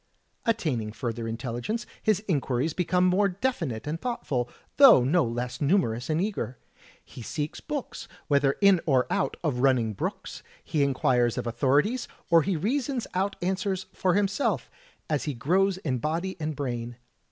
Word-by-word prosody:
Attaining 140 Hz, -, 0 dB
further 115 Hz, 0 st, -4 dB
intelligence, 120 Hz, -, -3 dB, 0.2 s
his 215 Hz, -2 st, +2 dB
inquiries 140 Hz, -3 st, 0 dB
become 180 Hz, +1 st, +2 dB
more 195 Hz, +2 st, +3 dB
definite 180 Hz, -, -2 dB
and 155 Hz, +3 st, -3 dB
thoughtful, 135 Hz, -, -2 dB, 0.3 s
though 265 Hz, -, +9 dB
no 160 Hz, +6 st, +3 dB
less 120 Hz, +1 st, -3 dB
nimierous 140 Hz, -, +1 dB
and 155 Hz, +1 st, +1 dB
eager. 190 Hz, -, -2 dB, 0.5 s
He -, -, -11 dB
seeks 150 Hz, +6 st, -4 dB
books, 295 Hz, -4 st, -5 dB, 0.2 s
whether 140 Hz, -2 st, +3 dB
in 200 Hz, -4 st, +6 dB
or 130 Hz, -4 st, +3 dB
out 135 Hz, -, 0 dB
of 140 Hz, -7 st, 0 dB
running 125 Hz, -4 st, +2 dB
brooks; -, -, -5 dB, 0.2 s
he 150 Hz, -, -1 dB
inquires 130 Hz, -3 st, +2 dB
of -, -, -2 dB
authorities, 145 Hz, -, +1 dB, 0.2 s
or 165 Hz, -1 st, +7 dB
he 185 Hz, +4 st, 0 dB
reasons 250 Hz, -, -1 dB
out 195 Hz, +2 st, 0 dB
answers 190 Hz, 0 st, -1 dB
for 180 Hz, -1 st, +1 dB
himself, 200 Hz, -, 0 dB, 0.4 s
as 150 Hz, -3 st, -1 dB
he 145 Hz, -3 st, -2 dB
grows 185 Hz, +10 st, +2 dB
in 135 Hz, -9 st, -2 dB
body 165 Hz, +8 st, -2 dB
and 155 Hz, -1 st, -3 dB
brain. 120 Hz, -3 st, -4 dB
155 Hz, 155 wpm, -27 LUFS, 125-195 Hz, 0.5 s, though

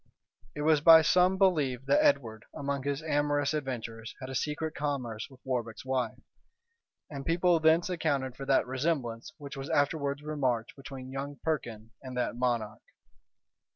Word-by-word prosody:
It 150 Hz, -, -3 dB
was 155 Hz, -1 st, +4 dB
by 160 Hz, 0 st, +9 dB
some 180 Hz, +3 st, +4 dB
believed 145 Hz, -10 st, +2 dB
that 300 Hz, -, +4 dB
Edward, 115 Hz, -, +1 dB
among 140 Hz, -1 st, -2 dB
his 140 Hz, +2 st, -2 dB
amorous 145 Hz, -1 st, +1 dB
adventures, 120 Hz, -6 st, -5 dB
had 130 Hz, -1 st, -7 dB
a -, -, -5 dB
secret 150 Hz, +3 st, -2 dB
commerce 130 Hz, -7 st, -3 dB
with 130 Hz, -1 st, -19 dB
Warbec's 120 Hz, -3 st, -3 dB
wife; 130 Hz, -2 st, -1 dB, 0.9 s
and 140 Hz, -2 st, -5 dB
people 170 Hz, +1 st, +3 dB
thence 160 Hz, +2 st, +4 dB
accounted 145 Hz, -8 st, -1 dB
for 135 Hz, +1 st, -8 dB
that 135 Hz, -, +3 dB
resemblance 130 Hz, -2 st, -2 dB
which 140 Hz, -2 st, -8 dB
was 135 Hz, 0 st, -6 dB
afterwards 145 Hz, 0 st, 0 dB
remarked 130 Hz, -7 st, -1 dB
between 135 Hz, -2 st, -9 dB
young 140 Hz, +1 st, -5 dB
Perkin 115 Hz, -8 st, -3 dB
and 130 Hz, -2 st, -7 dB
that 125 Hz, -, -1 dB
monarch. 120 Hz, -3 st, -1 dB
140 Hz, 155 wpm, -30 LUFS, 125-155 Hz, 0.9 s, by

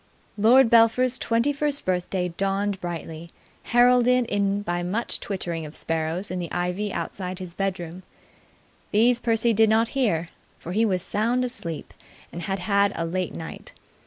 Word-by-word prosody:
Lord 230 Hz, +4 st, +5 dB
Belpher's 235 Hz, +2 st, +4 dB
twenty 230 Hz, +5 st, +1 dB
first 285 Hz, 0 st, 0 dB
birthday 180 Hz, 0 st, -1 dB
dawned 195 Hz, +2 st, -2 dB
brightly, 170 Hz, -1 st, -6 dB, 0.4 s
heralded 245 Hz, +1 st, +4 dB
in 200 Hz, -1 st, 0 dB
by 175 Hz, -2 st, -2 dB
much 200 Hz, +7 st, -2 dB
twittering 175 Hz, -4 st, -4 dB
of 150 Hz, 0 st, -9 dB
sparrows 165 Hz, +4 st, -2 dB
in 185 Hz, -, -3 dB
the 170 Hz, -2 st, -5 dB
ivy 180 Hz, +4 st, -2 dB
outside 185 Hz, -1 st, -4 dB
his 180 Hz, -2 st, -8 dB
bedroom. 180 Hz, -2 st, -4 dB, 0.9 s
These 235 Hz, +3 st, +3 dB
Percy 230 Hz, -1 st, +2 dB
did 220 Hz, +1 st, +4 dB
not 225 Hz, +1 st, +3 dB
hear, 175 Hz, -, 0 dB, 0.3 s
for 170 Hz, -, -8 dB
he 220 Hz, +5 st, +2 dB
was 185 Hz, -4 st, +1 dB
sound 230 Hz, +7 st, 0 dB
asleep 190 Hz, -11 st, -3 dB, 0.4 s
and 170 Hz, -, -7 dB
had 195 Hz, +2 st, -2 dB
had 200 Hz, +1 st, +2 dB
a 165 Hz, -, -2 dB
late 180 Hz, +2 st, -3 dB
night. 165 Hz, -1 st, -8 dB
200 Hz, 155 wpm, -24 LUFS, 175-230 Hz, 0.9 s, Lord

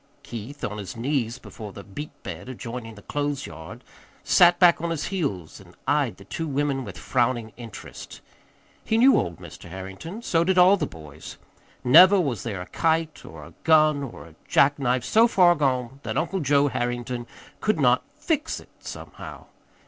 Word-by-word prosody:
Keith, 120 Hz, +5 st, -8 dB
on 105 Hz, 0 st, -3 dB
his 100 Hz, +3 st, -7 dB
knees 125 Hz, -1 st, -1 dB
before 110 Hz, -4 st, -10 dB
the 100 Hz, -, -10 dB
beet 145 Hz, +11 st, -9 dB
bed -, -, -7 dB
adjoining 115 Hz, -2 st, -7 dB
the 105 Hz, -, -14 dB
clothes 145 Hz, -1 st, -2 dB
yard, 80 Hz, 0 st, -10 dB, 0.4 s
sat 175 Hz, 0 st, +5 dB
back 175 Hz, -3 st, +5 dB
on 170 Hz, -, -2 dB
his 165 Hz, -3 st, -3 dB
heels 100 Hz, -, -3 dB
and -, -, -17 dB
eyed -, -, +1 dB
the -, -, -14 dB
two 165 Hz, -, -4 dB
women 140 Hz, -1 st, -1 dB
with 100 Hz, -6 st, -9 dB
frowning 120 Hz, -3 st, -1 dB
interest. 115 Hz, -3 st, -10 dB, 0.6 s
He 220 Hz, -, 0 dB
knew 260 Hz, +3 st, +6 dB
old 85 Hz, -3 st, -1 dB
Mr. -, -, -12 dB
Harrington. 95 Hz, -, -8 dB
So 165 Hz, -6 st, +2 dB
did 185 Hz, +1 st, +1 dB
all 180 Hz, +2 st, +7 dB
the 200 Hz, -, -2 dB
boys. 75 Hz, -2 st, -11 dB, 0.5 s
Never 180 Hz, +10 st, +8 dB
was 135 Hz, -, -1 dB
there 100 Hz, -6 st, -4 dB
a -, -, -6 dB
kite 160 Hz, -, -1 dB
or 75 Hz, -1 st, -11 dB
a -, -, -14 dB
gun 155 Hz, -2 st, +4 dB
or 115 Hz, -, -8 dB
a 80 Hz, -, -16 dB
jack 145 Hz, +1 st, +3 dB
knife 125 Hz, -2 st, +1 dB
so 225 Hz, +2 st, +5 dB
far 180 Hz, -6 st, +5 dB
gone 130 Hz, -4 st, -1 dB
that -, -, -4 dB
Uncle 180 Hz, +4 st, -1 dB
Joe 145 Hz, -1 st, +3 dB
Harrington 120 Hz, -1 st, -3 dB, 0.3 s
could 215 Hz, -6 st, 0 dB
not 125 Hz, -2 st, +4 dB
"fix 310 Hz, 0 st, -2 dB
it" -, -, -17 dB
somehow. -, -, -9 dB
135 Hz, 180 wpm, -25 LUFS, 115-165 Hz, 0.6 s, Never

